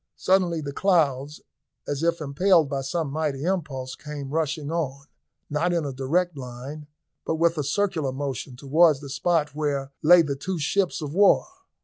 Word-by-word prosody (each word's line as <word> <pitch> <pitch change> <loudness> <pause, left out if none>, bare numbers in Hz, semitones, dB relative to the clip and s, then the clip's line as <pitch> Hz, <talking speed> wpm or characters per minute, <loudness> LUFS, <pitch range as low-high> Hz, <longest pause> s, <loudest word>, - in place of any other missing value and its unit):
Suddenly 180 -4 +2
the 140 -1 -5
clouds, 150 -6 +1 0.5
as 145 0 -2
if 170 0 +1
impelled 160 +3 +3
by 140 -1 -2
some 145 +2 -2
mighty 150 -2 -2
impulse, 150 -8 -2
came 145 -2 -7
rushing 155 -1 -1
on, 140 -5 -3 0.4
not 165 +4 0
in 170 -3 0
a 140 - -4
direct 160 +7 0
line, 135 +3 -8 0.4
but 160 - -1
with 165 +1 +2
a 150 - -1
circular 160 -2 0
motion, 135 -2 -4
towards 150 +3 +3
the 140 - -8
spot 150 +1 0
where 140 -2 -2
lay 170 +2 +7
the 140 -3 -2
two 185 +7 -4
ships 175 +2 0
of 145 -1 -5
war. 200 +2 +5
150 Hz, 165 wpm, -25 LUFS, 140-170 Hz, 0.5 s, lay